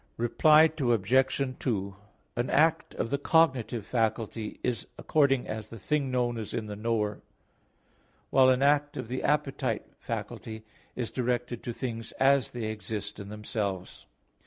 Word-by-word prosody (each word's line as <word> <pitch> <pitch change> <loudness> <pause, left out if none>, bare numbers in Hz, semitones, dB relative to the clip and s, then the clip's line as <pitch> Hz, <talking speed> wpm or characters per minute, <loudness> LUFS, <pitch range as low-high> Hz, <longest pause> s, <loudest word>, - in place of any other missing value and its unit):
Reply 155 +7 +5
Obj. 130 +3 +2
2: 100 -6 -2 0.4
An 120 +1 -1
act 160 +2 +2
of 115 - -2
the 140 - +1
cognitive 130 -8 +2
faculty 110 -2 -2
is 120 -3 -1
according 140 -4 +2
as 110 -1 -5
the 115 - -9
thing 140 +6 0
known 120 -2 0
is 110 - -5
in 110 - -2
the 105 -1 -6
knower; 105 -1 -1 1.1
while 130 -1 +6
an 130 +1 +3
act 145 +1 +3
of 115 - -5
the 130 +1 -2
appetite 145 -1 0
faculty 110 0 -6 0.3
is 120 -3 -3
directed 120 -1 -1
to 120 - -4
things 115 -2 -5
as 135 -1 +3
they 120 -2 -6
exist 105 -1 -5
in 100 0 -7
themselves. 105 -3 -4
120 Hz, 145 wpm, -29 LUFS, 110-135 Hz, 1.1 s, while